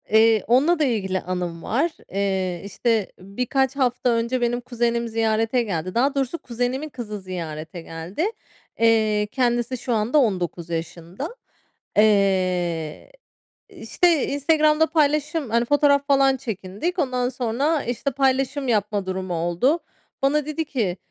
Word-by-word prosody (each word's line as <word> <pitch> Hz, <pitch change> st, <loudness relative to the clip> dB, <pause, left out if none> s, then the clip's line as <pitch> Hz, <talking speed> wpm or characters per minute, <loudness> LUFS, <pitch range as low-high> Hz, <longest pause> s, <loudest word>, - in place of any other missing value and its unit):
Eee, 220 Hz, 0 st, +5 dB
onunla 290 Hz, +9 st, +4 dB
da -, -, +3 dB
ilgili 195 Hz, -8 st, 0 dB
anım 180 Hz, -2 st, -4 dB
var. 295 Hz, +9 st, 0 dB, 0.2 s
Eee, 190 Hz, -3 st, -1 dB
işte, 220 Hz, 0 st, 0 dB
birkaç 250 Hz, +7 st, -1 dB
hafta 250 Hz, -2 st, +1 dB
önce 235 Hz, +2 st, 0 dB
benim 240 Hz, 0 st, 0 dB
kuzenim 235 Hz, -1 st, -1 dB
ziyarete 225 Hz, +2 st, +1 dB
geldi. 185 Hz, -4 st, -3 dB
Daha 270 Hz, +4 st, +2 dB
doğrusu 270 Hz, +3 st, -1 dB
kuzenimin 250 Hz, +3 st, -3 dB
kızı 220 Hz, -6 st, -6 dB
ziyarete 165 Hz, -2 st, -6 dB
geldi. 165 Hz, -, -4 dB, 0.5 s
Eee, 215 Hz, -2 st, +3 dB
kendisi 240 Hz, -1 st, 0 dB
şu 245 Hz, 0 st, -2 dB
anda 225 Hz, +6 st, +1 dB
19 180 Hz, -, 0 dB
yaşında. 170 Hz, -, -5 dB, 0.6 s
Eee, 185 Hz, -, +1 dB, 0.6 s
işte, 340 Hz, -5 st, +1 dB
Instagram'da 305 Hz, +2 st, +3 dB
paylaşıyorum, 305 Hz, -2 st, +1 dB
hani, 235 Hz, +1 st, +2 dB
fotoğraf 285 Hz, +1 st, +3 dB
falan 275 Hz, -1 st, +4 dB
çekindik. 225 Hz, -, -4 dB
Ondan 250 Hz, -4 st, 0 dB
sonra, 265 Hz, +5 st, 0 dB
işte, 245 Hz, +4 st, -2 dB
paylaşım 270 Hz, +1 st, 0 dB
yapma 210 Hz, -3 st, 0 dB
durumu 185 Hz, -1 st, -3 dB
oldu. 175 Hz, -, +1 dB, 0.4 s
Bana 280 Hz, +2 st, +2 dB
dedi 305 Hz, +2 st, -3 dB
ki, 220 Hz, -11 st, -2 dB
235 Hz, 130 wpm, -23 LUFS, 190-275 Hz, 0.6 s, Eee